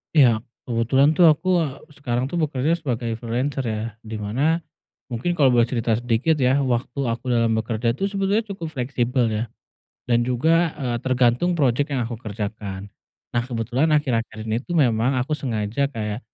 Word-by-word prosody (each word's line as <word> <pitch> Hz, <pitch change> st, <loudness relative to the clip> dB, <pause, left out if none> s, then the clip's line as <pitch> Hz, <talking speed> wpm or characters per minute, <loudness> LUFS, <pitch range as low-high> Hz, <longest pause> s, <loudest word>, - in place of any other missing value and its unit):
Iya, 120 Hz, -7 st, +6 dB, 0.2 s
kebetulan 130 Hz, +5 st, +3 dB
tuh 175 Hz, -2 st, +7 dB
aku, 155 Hz, +4 st, +3 dB
eee, 145 Hz, -5 st, -2 dB, 0.2 s
sekarang 125 Hz, -1 st, -2 dB
tuh 175 Hz, -, -1 dB
bekerja 155 Hz, +2 st, +1 dB
sebagai 120 Hz, -6 st, -2 dB
freelancer, 125 Hz, +4 st, -2 dB
ya, 110 Hz, -1 st, -2 dB, 0.2 s
di 110 Hz, -1 st, -8 dB
mana 135 Hz, +11 st, 0 dB, 0.4 s
mungkin 125 Hz, +7 st, -2 dB
kalau 135 Hz, -4 st, +5 dB
boleh 120 Hz, -1 st, +4 dB
cerita 115 Hz, -2 st, +1 dB
sedikit, 120 Hz, +7 st, +1 dB
ya, 130 Hz, +2 st, +4 dB
waktu 125 Hz, -1 st, -1 dB
aku 115 Hz, +2 st, -3 dB
dalam 115 Hz, -1 st, +2 dB
bekerja 115 Hz, +1 st, 0 dB
tuh 195 Hz, +9 st, -2 dB
sebetulnya 200 Hz, +2 st, +1 dB
cukup 190 Hz, -4 st, -5 dB
fleksibel, 125 Hz, -1 st, 0 dB
ya, 110 Hz, +1 st, -1 dB, 0.7 s
dan 120 Hz, 0 st, +3 dB
juga, 160 Hz, +7 st, +2 dB
eee, 120 Hz, -2 st, -1 dB
tergantung 130 Hz, +7 st, +2 dB
projek 140 Hz, -1 st, +1 dB
yang 130 Hz, -, 0 dB
aku 115 Hz, -1 st, -5 dB
kerjakan. 100 Hz, -3 st, -6 dB, 0.4 s
Nah, 120 Hz, 0 st, 0 dB
kebetulan 125 Hz, +5 st, 0 dB
akhir-akhir 115 Hz, -6 st, -1 dB
ini 110 Hz, 0 st, -1 dB
tuh 175 Hz, -, -3 dB
memang 125 Hz, -3 st, +3 dB
aku 140 Hz, -, -5 dB
sengaja 115 Hz, +1 st, -1 dB
kayak 105 Hz, -5 st, -4 dB
125 Hz, 165 wpm, -23 LUFS, 115-145 Hz, 0.7 s, tuh